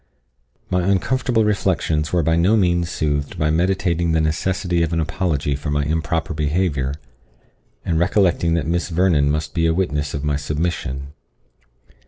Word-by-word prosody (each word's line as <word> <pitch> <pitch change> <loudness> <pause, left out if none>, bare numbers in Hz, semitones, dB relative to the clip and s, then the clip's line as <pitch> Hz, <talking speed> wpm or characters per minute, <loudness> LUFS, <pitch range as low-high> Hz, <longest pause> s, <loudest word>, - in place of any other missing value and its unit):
My 90 - +2
uncomfortable 115 +3 +1
reflections 90 -7 0
were 85 -2 +2
by 80 +2 +2
no 90 +7 +3
means 85 -3 +1
soothed 75 -3 -2
by 75 0 +1
meditating 85 -1 +1
the 80 - +2
necessity 85 +3 0
of 85 0 0
an 85 - +1
apology 80 -3 -1
for 75 +2 -5
my 75 0 0
improper 80 +3 -1
behaviour, 75 -3 -1 0.9
and 80 -2 +1
recollecting 85 -2 +2
that 80 -4 -1
Miss 85 +3 -1
Vernon 80 -4 +2
must 75 0 -2
be 80 0 +1
a 80 - +1
witness 75 -6 -1
of 70 - -4
my 75 -1 0
submission. 75 -3 -3
80 Hz, 155 wpm, -21 LUFS, 75-90 Hz, 0.9 s, no